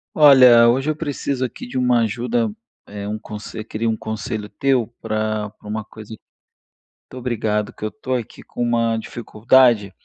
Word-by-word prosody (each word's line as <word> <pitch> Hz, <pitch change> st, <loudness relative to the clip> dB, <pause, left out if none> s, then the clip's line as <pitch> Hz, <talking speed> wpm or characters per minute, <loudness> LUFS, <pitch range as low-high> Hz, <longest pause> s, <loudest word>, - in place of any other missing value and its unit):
Olha, 130 Hz, -6 st, +8 dB
hoje 135 Hz, +5 st, +2 dB
eu 155 Hz, -, 0 dB
preciso 140 Hz, -4 st, -3 dB
aqui 120 Hz, -, -8 dB
de 125 Hz, -, -5 dB
uma 125 Hz, -1 st, +3 dB
ajuda, 115 Hz, 0 st, -1 dB, 0.4 s
eh, 100 Hz, 0 st, -7 dB
um 105 Hz, +1 st, -4 dB
conse 105 Hz, 0 st, -8 dB
eu -, -, -4 dB
queria 115 Hz, +1 st, -3 dB
um 110 Hz, -, +1 dB
conselho 110 Hz, -1 st, -5 dB
teu 130 Hz, -5 st, +1 dB
pra 110 Hz, -1 st, -2 dB
pra 105 Hz, -, -17 dB
uma 110 Hz, 0 st, -4 dB
coisa 110 Hz, -1 st, -13 dB
muito 110 Hz, -, -14 dB, 0.8 s
obrigado, 110 Hz, -4 st, -2 dB
que -, -, -12 dB
eu 110 Hz, -, -1 dB
tô 130 Hz, -3 st, -5 dB
aqui 120 Hz, -3 st, -5 dB
com -, -, -8 dB
uma 115 Hz, -1 st, +1 dB
dificuldade, 115 Hz, -1 st, +2 dB
115 Hz, 175 wpm, -20 LUFS, 110-125 Hz, 0.8 s, Olha